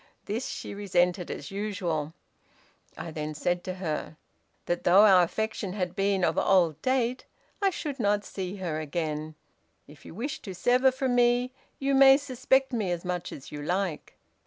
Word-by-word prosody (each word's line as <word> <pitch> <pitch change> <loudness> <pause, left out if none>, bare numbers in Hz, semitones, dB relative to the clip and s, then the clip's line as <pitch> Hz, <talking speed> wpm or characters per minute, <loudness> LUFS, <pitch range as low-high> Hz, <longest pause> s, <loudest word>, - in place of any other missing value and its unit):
This 225 +5 -3
she - - -6
resented 180 -3 0
as - - -6
usual. 180 -7 -3 0.8
I 165 - -6
then 155 0 -5
said 175 +3 -1
to 185 - -4
her, 160 -3 -4 0.5
that 175 0 -2
though 190 +4 +7
our 190 -3 +7
affection 205 +1 -2
had 180 -3 -3
been 195 -1 +1
of 160 - +1
old 170 -5 +3
date, 255 -1 0 0.4
I 395 - +4
should 295 -7 -5
not 205 -1 +1
see 190 0 -5
her 175 -5 -3
again; 155 0 -3 0.5
'if 150 0 -16
you - - -11
wish 275 +8 -4
to 190 -3 -7
sever 250 +6 +3
from 260 -1 -1
me 245 +1 +3 0.3
you 275 0 0
may 270 0 +8
suspect 265 -1 +1
me 215 -6 -1
as 175 0 -3
much 180 -1 -3
as 135 - -10
you 145 - -6
like. 180 +1 -2
195 Hz, 170 wpm, -28 LUFS, 175-245 Hz, 0.8 s, may